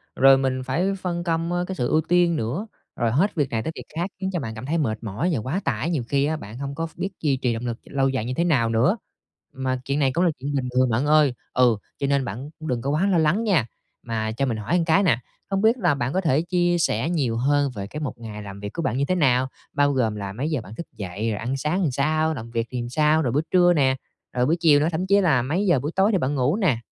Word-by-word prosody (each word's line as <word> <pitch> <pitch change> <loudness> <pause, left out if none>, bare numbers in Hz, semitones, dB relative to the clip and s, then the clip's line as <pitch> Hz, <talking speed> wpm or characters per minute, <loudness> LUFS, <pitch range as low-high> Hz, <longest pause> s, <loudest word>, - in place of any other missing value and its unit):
rồi 135 0 +7
mình 130 -1 -1
phải 180 +9 0
phân 175 -1 -2
công, 165 0 -1
ơ, 175 0 0
cái 190 - -4
sự 125 - -1
ưu 155 - +3
tiên 175 +1 +2
nữa, 150 - -3 0.3
rồi 115 -2 0
hết 175 - +1
việc 145 -5 0
này 110 -1 -2
tới 160 - -3
việc - - -7
khác 175 +3 -1
khiến 190 0 -2
cho 175 - 0
bạn 110 -5 -5
cảm 110 - -7
thấy 155 +5 0
mệt 110 -8 -1
mỏi 110 - -2
và 130 - 0
quá 130 - -2
tải, 130 +5 -1
nhiều 150 -8 -1
khi 140 0 +2
á, 155 +1 -1
bạn 110 -3 -9
hông 140 +1 -5
có 165 - -2
ph - - -21
biết 195 - -2
duy 140 -4 +1
trì 125 -2 0
động 115 +2 -4
lực 120 -1 -3
lâu 135 -1 0
dài 130 -4 -2
như 125 - -2
thế 170 - 0
nào 135 -10 +2
nữa. 120 - +2 0.6
Mà 130 -1 -2
chuyện 140 +2 -1
này 135 -3 +2
cũng 170 - +2
là 170 - +3
chuyện 140 +2 -3
bình 130 -2 -1
thường 130 0 +4
bạn 120 +5 +1
ơi, 150 -3 +4 0.2
ừ, 120 -4 +4 0.2
cho 140 - 0
nên 140 -2 +1
bạn 120 +8 -6
cũng 155 - -7
đừng 125 -4 -1
có 135 - -2
quá 155 +7 +2
lo 185 - +3
lắng 165 +8 +2
nha. 180 - +2 0.4
Mà 110 -2 -2
cho 130 +5 -1
mình 115 -4 -1
hỏi 110 +10 -3
một 170 - +1
cái 180 +4 +4
nè, 140 -11 +3 0.3
không 195 -1 0
biết 225 +4 +4
là 175 -9 +2
bạn 125 0 -2
có 190 - +1
thể 155 -4 +2
chia 175 0 +1
sẻ 145 -1 +1
nhiều 135 -10 0
hơn 140 +2 +2
về 100 -1 -5
cái 150 - -7
một 145 -4 -4
ngày 105 -2 -7
làm 100 -1 -8
việc 100 +1 -6
của 170 - -3
bạn 125 -5 -1
như 140 - +1
thế 185 - 0
nào? 130 -6 +3 0.3
Bao 145 0 +3
gồm 115 -5 +1
là 100 -2 -5
mấy 135 +9 -2
giờ 150 -6 -1
bạn 105 +2 -11
thức 170 - -6
dậy, 100 +2 -3
rồi 105 - -2
ăn 125 +4 -2
sáng 155 +8 -1
làm 155 -7 +1
sao, 155 +4 +1
làm 115 -5 -7
việc 115 0 -1
thì 125 -2 -2
làm 120 - -5
sao? 155 +4 +3
Rồi 125 -6 0
bữa 145 +4 +2
trưa 175 -1 +5
nè, 135 -4 +3 0.4
rồi 125 0 +1
buổi 165 +4 +2
chiều 155 -4 +5
nữa, 150 - +2
thậm 175 +4 -2
chí 200 +1 +4
là 150 -10 +3
mấy 160 +11 -1
giờ 175 -8 +3
buổi 145 +5 -3
tối 195 +3 +4
thì 200 - +2
bạn 145 -3 -1
ngủ 135 +5 +2
nè? 155 - +1
140 Hz, 295 wpm, -24 LUFS, 120-165 Hz, 0.6 s, rồi